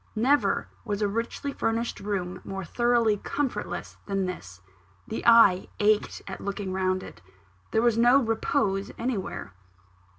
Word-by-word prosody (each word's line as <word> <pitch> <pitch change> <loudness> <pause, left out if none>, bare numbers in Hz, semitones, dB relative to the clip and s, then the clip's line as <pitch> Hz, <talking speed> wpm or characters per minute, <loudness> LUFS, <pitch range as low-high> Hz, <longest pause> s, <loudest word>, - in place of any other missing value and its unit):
Never 265 +7 +2 0.2
was 210 -2 -2
a - - +3
richly 230 +6 -3
furnished 230 -1 -1
room 195 -3 -3
more 195 -1 -5
thoroughly 235 +1 +2
comfortless 275 +5 -3
than 195 -1 0
this 95 - -7 0.5
the 220 - -4
eye 230 -6 +6
ached 210 0 +2
at 195 - -7
looking 200 -1 -4
round 185 0 0
it. 85 - -11 0.5
There 220 - +1
was 235 -1 +3
no 240 +3 +6
repose 220 -4 0
anywhere. 220 - -3
210 Hz, 135 wpm, -27 LUFS, 195-235 Hz, 0.5 s, eye